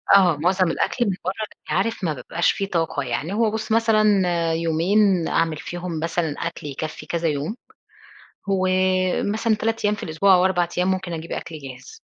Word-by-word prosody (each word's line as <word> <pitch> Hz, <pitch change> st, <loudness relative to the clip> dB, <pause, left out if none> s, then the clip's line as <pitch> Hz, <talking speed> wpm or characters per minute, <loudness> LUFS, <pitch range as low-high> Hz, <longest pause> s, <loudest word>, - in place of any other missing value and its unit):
آه. 180 Hz, -6 st, +5 dB
مُعظم 180 Hz, +2 st, +2 dB
الأكل 240 Hz, +8 st, 0 dB
من 195 Hz, -4 st, 0 dB
برّه، 185 Hz, -, 0 dB, 0.2 s
بس -, -, -20 dB
عارف 220 Hz, +1 st, 0 dB
ما 160 Hz, -3 st, +1 dB
بابقاش 170 Hz, +4 st, 0 dB
في 195 Hz, -, -2 dB
طاقة. 165 Hz, -6 st, -1 dB
يعني 140 Hz, +8 st, -3 dB
هو 220 Hz, 0 st, +2 dB
بُص 220 Hz, 0 st, -4 dB
مثلًا 225 Hz, -1 st, +3 dB, 0.5 s
يومين 170 Hz, +3 st, +2 dB
أعمل 165 Hz, -2 st, +1 dB
فيهم 175 Hz, 0 st, -5 dB
مثلًا 165 Hz, -2 st, -1 dB
أكل 170 Hz, -3 st, -7 dB
يكفّي 150 Hz, +3 st, -6 dB
كذا 170 Hz, -1 st, -1 dB
يوم، 150 Hz, +7 st, -2 dB, 0.9 s
ومثلًا 185 Hz, +3 st, +1 dB
3 225 Hz, +1 st, -2 dB
أيام 210 Hz, 0 st, +2 dB
في -, -, -8 dB
الأسبوع، 180 Hz, +5 st, +3 dB
أو 180 Hz, 0 st, +3 dB
4 175 Hz, -2 st, +2 dB
أيام، 180 Hz, +1 st, +2 dB
ممكن 185 Hz, -2 st, -3 dB
أجيب 165 Hz, 0 st, -6 dB
أكل 160 Hz, -, -5 dB
جاهز. 130 Hz, -2 st, -11 dB
180 Hz, 175 wpm, -23 LUFS, 160-200 Hz, 0.9 s, آه